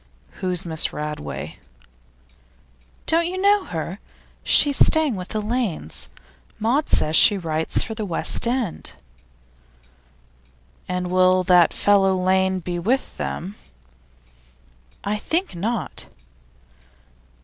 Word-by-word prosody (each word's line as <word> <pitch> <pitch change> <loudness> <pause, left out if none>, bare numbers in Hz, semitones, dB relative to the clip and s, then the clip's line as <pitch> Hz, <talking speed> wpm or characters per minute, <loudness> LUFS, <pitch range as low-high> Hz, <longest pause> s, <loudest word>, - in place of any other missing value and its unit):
'Who's 180 -1 -2
Miss 160 -2 +1
Radway?' 150 0 -6 1.5
'Don't 335 +1 +2
you 370 +1 -4
know 400 +1 +3
her? 170 +3 -5 0.4
She's 285 -2 +5
staying 315 -6 +2
with 180 -1 -6
the 215 - -3
Lanes. 210 - -4 0.5
Maud 250 +8 0
says 155 +1 +1
she 205 - +7
writes 160 -3 0
for 225 - -5
The 220 0 -5
West 195 +4 -1
End.' 240 -7 -3 2.0
'And 180 0 -3
will 185 0 +3
that 180 -2 +4
fellow 195 -2 +2
Lane 190 0 +1
be 175 0 -4
with 245 +10 -1
them?' 185 +4 -5 1.5
'I 205 +1 -2
think 340 - -2
not. 215 +7 -4
190 Hz, 105 wpm, -22 LUFS, 175-240 Hz, 2.0 s, she